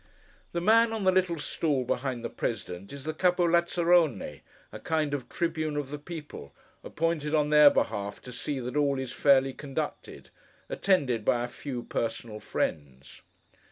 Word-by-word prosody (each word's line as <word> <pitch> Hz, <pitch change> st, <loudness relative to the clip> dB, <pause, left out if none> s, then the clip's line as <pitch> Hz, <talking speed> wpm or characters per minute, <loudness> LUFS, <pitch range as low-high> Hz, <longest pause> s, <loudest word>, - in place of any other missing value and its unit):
The 170 Hz, -, -2 dB
man 225 Hz, +4 st, +5 dB
on 220 Hz, -2 st, -3 dB
the 190 Hz, -, +5 dB
little 185 Hz, -2 st, +1 dB
stool 150 Hz, -2 st, -1 dB
behind 125 Hz, -1 st, -2 dB
the -, -, -2 dB
President, 100 Hz, -4 st, -4 dB
is 140 Hz, -1 st, -8 dB
the 155 Hz, +1 st, -3 dB
Capo 180 Hz, +1 st, +2 dB
Lazzarone, 170 Hz, -, +2 dB, 0.3 s
a -, -, -8 dB
kind 155 Hz, -3 st, -1 dB
of 135 Hz, -4 st, -4 dB
tribune 160 Hz, -3 st, -2 dB
of 145 Hz, -2 st, -3 dB
the 150 Hz, -, -5 dB
people, 150 Hz, -, -9 dB, 0.3 s
appointed 160 Hz, -1 st, -1 dB
on 150 Hz, -1 st, +1 dB
their 150 Hz, -1 st, +9 dB
behalf 100 Hz, -6 st, -1 dB
to 125 Hz, -, -9 dB
see 135 Hz, +3 st, -3 dB
that 125 Hz, +2 st, -5 dB
all 140 Hz, -2 st, +2 dB
is 130 Hz, -2 st, -4 dB
fairly 135 Hz, -1 st, +3 dB
conducted: 135 Hz, -1 st, -6 dB, 0.4 s
attended 140 Hz, -, +1 dB
by 120 Hz, +2 st, +2 dB
a -, -, -2 dB
few 125 Hz, 0 st, -6 dB
personal 115 Hz, -2 st, -4 dB
friends. 70 Hz, -8 st, -4 dB
145 Hz, 160 wpm, -28 LUFS, 120-165 Hz, 0.4 s, their